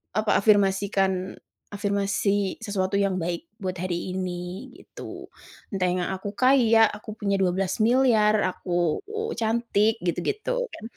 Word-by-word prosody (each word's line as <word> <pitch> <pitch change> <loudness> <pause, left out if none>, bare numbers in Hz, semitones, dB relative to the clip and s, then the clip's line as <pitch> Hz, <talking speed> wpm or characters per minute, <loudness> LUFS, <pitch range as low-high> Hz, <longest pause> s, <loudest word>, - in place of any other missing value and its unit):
apa, 215 0 +2
afirmasikan, 195 -2 +2 0.4
afirmasi 200 -1 0
sesuatu 200 -1 -1
yang 195 -2 +1
baik 170 +2 -4
buat 185 -2 -3
hari 180 +1 -3
ini, 185 +5 -5
gitu. - - -10 0.5
Entah 185 -1 +1
yang 180 -1 -1
aku 200 +2 -6
kaya, 230 -2 +5
aku 210 +1 -8
punya 200 -1 0
12 190 +3 0
miliar, 225 -3 +4
aku 175 -3 -1
u 440 +1 -3
cantik 225 -1 +1
gitu-gitu, 180 - -2 0.2
kan. - - -10
200 Hz, 125 wpm, -25 LUFS, 185-220 Hz, 0.5 s, kaya